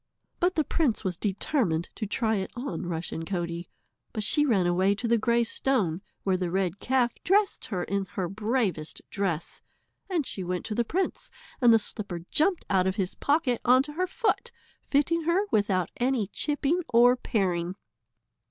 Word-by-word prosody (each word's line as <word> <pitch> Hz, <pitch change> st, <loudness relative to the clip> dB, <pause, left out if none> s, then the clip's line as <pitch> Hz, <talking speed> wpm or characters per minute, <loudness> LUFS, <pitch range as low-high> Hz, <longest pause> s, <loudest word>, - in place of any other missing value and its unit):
But 360 Hz, +1 st, +2 dB
the 310 Hz, -, +3 dB
prince 285 Hz, -9 st, 0 dB
was 185 Hz, -3 st, -1 dB
determined 195 Hz, -, -1 dB
to 215 Hz, -, -4 dB
try 220 Hz, +1 st, 0 dB
it 190 Hz, -, -3 dB
on 240 Hz, -10 st, -4 dB
Rushen 165 Hz, -1 st, -4 dB
Coatie, 170 Hz, -1 st, -3 dB, 0.4 s
but 215 Hz, -, -2 dB
she 295 Hz, +8 st, +3 dB
ran 200 Hz, -8 st, +3 dB
away 185 Hz, +3 st, +3 dB
to 230 Hz, +3 st, -3 dB
the 230 Hz, 0 st, +3 dB
grey 235 Hz, +2 st, +3 dB
stone, 220 Hz, -8 st, 0 dB, 0.2 s
where 190 Hz, -1 st, +2 dB
the 180 Hz, -1 st, -2 dB
red 190 Hz, +1 st, -1 dB
calf 250 Hz, -2 st, +1 dB
dressed 400 Hz, +2 st, +2 dB
her 185 Hz, -5 st, -2 dB
in 200 Hz, 0 st, -1 dB
her 185 Hz, -2 st, -1 dB
bravest 210 Hz, -6 st, -1 dB
dress, 180 Hz, -5 st, -2 dB, 0.5 s
and 340 Hz, -7 st, 0 dB
she 190 Hz, -, -4 dB
went 180 Hz, 0 st, -3 dB
to 225 Hz, -, -3 dB
the 235 Hz, -, +1 dB
prince 365 Hz, +11 st, -2 dB, 0.3 s
and 240 Hz, -2 st, +7 dB
the 225 Hz, -, +7 dB
slipper 200 Hz, -5 st, -5 dB
jumped 360 Hz, +3 st, +2 dB
out 190 Hz, -2 st, +2 dB
of 190 Hz, -, 0 dB
his 190 Hz, -3 st, -1 dB
pocket 285 Hz, -5 st, +1 dB
on 255 Hz, +2 st, +5 dB
to 295 Hz, +1 st, -8 dB
her 365 Hz, +4 st, 0 dB
foot, 475 Hz, +4 st, -1 dB, 0.3 s
fitting 310 Hz, +4 st, +1 dB
her 355 Hz, +5 st, +2 dB
without 195 Hz, -4 st, +1 dB
any 245 Hz, -3 st, +1 dB
chipping 295 Hz, -, 0 dB
or 245 Hz, +1 st, +6 dB
paring. 185 Hz, -7 st, -1 dB
220 Hz, 175 wpm, -27 LUFS, 185-270 Hz, 0.5 s, and